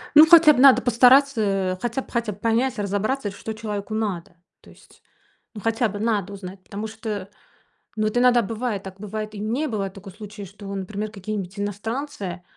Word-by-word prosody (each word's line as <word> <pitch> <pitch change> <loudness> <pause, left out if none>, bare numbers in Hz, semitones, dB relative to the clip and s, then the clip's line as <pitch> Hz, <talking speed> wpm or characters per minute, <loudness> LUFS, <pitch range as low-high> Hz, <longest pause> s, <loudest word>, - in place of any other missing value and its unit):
Ну, 305 +1 +11
хотя 325 -2 +8
б 250 - -1
надо 270 0 +7
постараться, 250 +2 +5
э, 195 -3 0
хотя 240 +2 -2
б - - -15
хотя 235 -3 -1
б 195 - -16
понять, 230 +3 0
разобраться, 205 +3 -1
что 220 +2 -7
человеку 215 -1 -5
надо. 200 -7 -3 0.3
То - - -18
есть, - - -20 0.5
ну, 210 - -7
хотя 225 +2 +1
бы 205 +1 -6
надо 210 -3 -1
узнать, 190 -1 -9
потому 210 +3 -6
что, 215 -3 -6 0.7
ну, 215 - -1
вот 215 +3 -2
иногда 245 -1 +5
бывает 220 -1 -3
так, 190 0 -10
бывает, 215 +1 -5
и 205 - -6
мне 245 +9 -1
бывает 195 -4 -3
такой 195 -1 -11
случай, 210 0 -9
что, 200 +1 -9
например, 205 +2 -4
какие-нибудь 195 -1 -6
иностранцы, 205 -2 -4
215 Hz, 185 wpm, -23 LUFS, 200-235 Hz, 0.7 s, Ну